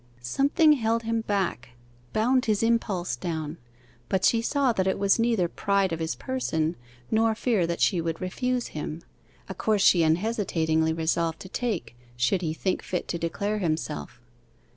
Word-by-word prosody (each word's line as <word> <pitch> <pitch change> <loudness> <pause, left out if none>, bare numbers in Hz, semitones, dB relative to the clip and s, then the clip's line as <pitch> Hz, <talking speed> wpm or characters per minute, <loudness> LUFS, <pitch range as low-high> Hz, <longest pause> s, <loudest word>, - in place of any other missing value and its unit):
Something 285 - +4
held 230 -3 0
him 225 0 0
back, 195 - -2 0.4
bound 250 +4 +2
his 215 -1 +1
impulse 205 - 0
down, 160 +3 -4 0.5
but 190 0 +1
she 230 - +4
saw 270 0 +1
that 190 -3 0
it 190 - +1
was 200 +2 +3
neither 230 -6 +2
pride 195 0 0
of 165 - -3
his 160 0 -2
person, 170 - -1 0.4
nor 225 0 +3
fear 220 -6 +1
that 170 0 -2
she 180 -5 +3
would 165 0 -3
refuse 250 +7 -2
him 155 +2 -6 0.4
a - - -5
course 210 -3 +1
she 175 - +6
unhesitatingly 160 -3 +1
resolved 160 0 0
to 185 - -9
take 210 - -3 0.2
should 125 +10 +1
he 160 -3 -1
think 185 +4 -1
fit 180 - -3
to 170 - -2
declare 200 +6 -2
himself. 155 -8 -3
190 Hz, 165 wpm, -26 LUFS, 165-225 Hz, 0.5 s, she